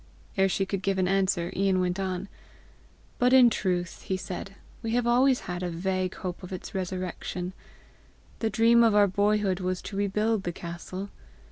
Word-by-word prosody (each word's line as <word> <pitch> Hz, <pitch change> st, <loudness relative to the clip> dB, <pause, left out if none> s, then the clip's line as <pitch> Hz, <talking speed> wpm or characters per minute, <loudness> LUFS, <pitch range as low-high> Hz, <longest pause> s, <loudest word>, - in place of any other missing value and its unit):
Ere 195 Hz, 0 st, +3 dB
she 195 Hz, +1 st, 0 dB
could 195 Hz, 0 st, -3 dB
give 195 Hz, 0 st, 0 dB
an 185 Hz, -1 st, +2 dB
answer, 190 Hz, -2 st, +1 dB
Ian 190 Hz, -1 st, +2 dB
went 180 Hz, +1 st, 0 dB
on. 190 Hz, 0 st, -2 dB, 0.9 s
"But 250 Hz, +1 st, +4 dB
in 250 Hz, -3 st, +8 dB
truth," 180 Hz, -4 st, -1 dB
he 190 Hz, -, -2 dB
said, 190 Hz, +1 st, -6 dB, 0.3 s
"we 225 Hz, -1 st, -2 dB
have 245 Hz, -1 st, +1 dB
always 250 Hz, +2 st, +4 dB
had 180 Hz, -1 st, -5 dB
a 180 Hz, -, -2 dB
vague 185 Hz, +2 st, -2 dB
hope 180 Hz, -2 st, -5 dB
of 180 Hz, -, -9 dB
its 185 Hz, -, -6 dB
resurrection. 185 Hz, -1 st, -4 dB, 0.9 s
The 225 Hz, -, 0 dB
dream 235 Hz, +1 st, +5 dB
of 225 Hz, -2 st, +4 dB
our 205 Hz, -1 st, +7 dB
boyhood 200 Hz, -1 st, +1 dB
was 185 Hz, 0 st, -1 dB
to 200 Hz, -, -7 dB
rebuild 210 Hz, +2 st, +1 dB
the 175 Hz, -2 st, -3 dB
castle. 175 Hz, +4 st, -7 dB
190 Hz, 175 wpm, -27 LUFS, 180-210 Hz, 0.9 s, in